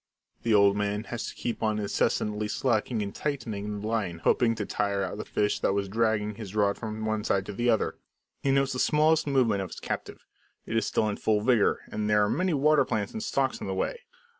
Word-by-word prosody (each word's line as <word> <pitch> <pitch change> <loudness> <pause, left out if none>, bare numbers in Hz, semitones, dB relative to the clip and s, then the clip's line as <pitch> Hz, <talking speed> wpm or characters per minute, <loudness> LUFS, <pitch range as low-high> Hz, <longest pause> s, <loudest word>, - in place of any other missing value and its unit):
The 115 -2 +2
old 100 -1 +5
man 105 +1 -1
has 120 0 -5
to - - -10
keep 120 - -4
on 110 -1 +1
incessantly 105 +1 0
slacking 110 0 0
and 100 - -5
tightening 105 -8 -3
the 105 - -4
line; 105 -7 -1
hoping 115 -2 +3
to 105 -2 -3
tire 100 -1 -1
out - - -4
the - - -4
fish 105 0 0
that - - +1
was 100 0 -1
dragging 105 0 0
his 105 -2 -8
rod 100 -1 +2
from 110 0 -5
one 110 -1 -1
side 95 -2 +1
to 105 - -6
the 120 +4 0
other. 110 -2 +1 0.4
He 140 - 0
notes 135 -1 +2
the 125 - -3
smallest 155 +2 +3
movement 125 -8 +2
of 95 - -5
his - - -8
captive. - - -5 0.4
It 115 - -4
is 110 -2 +1
still 110 - +1
in 105 - -2
full 105 -1 +1
vigour, 115 -2 +3
and 105 0 -2
there 105 -1 +4
are - - -1
many 180 +1 +1
water 150 +1 +4
plants 105 -2 -2
and 220 - -4
stalks 135 - -1
in - - -4
the 95 - -2
way. 95 - -2
110 Hz, 230 wpm, -28 LUFS, 105-120 Hz, 0.4 s, old